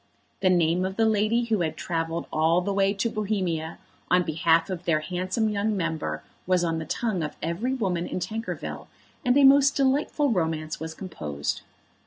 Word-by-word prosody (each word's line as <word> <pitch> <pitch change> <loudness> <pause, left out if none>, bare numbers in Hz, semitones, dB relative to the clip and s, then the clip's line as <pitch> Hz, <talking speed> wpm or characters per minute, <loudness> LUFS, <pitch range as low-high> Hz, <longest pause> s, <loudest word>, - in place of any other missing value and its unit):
The 190 - +3
name 175 0 +3
of 190 0 -2
the 225 - +3
lady 220 +2 +2
who 220 -5 0
had 160 -2 -2
travelled 165 0 -2
all 160 +3 +3
the 200 +2 -2
way 195 0 +3
to 200 +2 -1
Bohemia 190 -7 -2 0.3
on 180 0 +4
behalf 165 0 +2
of 180 -1 -5
their 155 -2 +2
handsome 185 +6 -1
young 210 0 0
member 160 - -2 0.2
was 185 -1 +3
on 165 -1 0
the 160 - -5
tongue 220 -4 -1
of 150 - -4
every 200 +11 -1
woman 180 -8 -1
in - - -3
Tankerville, 220 +6 -5 0.4
and 250 0 +3
a 285 - +6
most 275 +1 +6
delightful 280 +1 +2
romance 160 -5 -1
was 160 0 -6
composed. 75 - -4
180 Hz, 180 wpm, -26 LUFS, 165-215 Hz, 0.4 s, a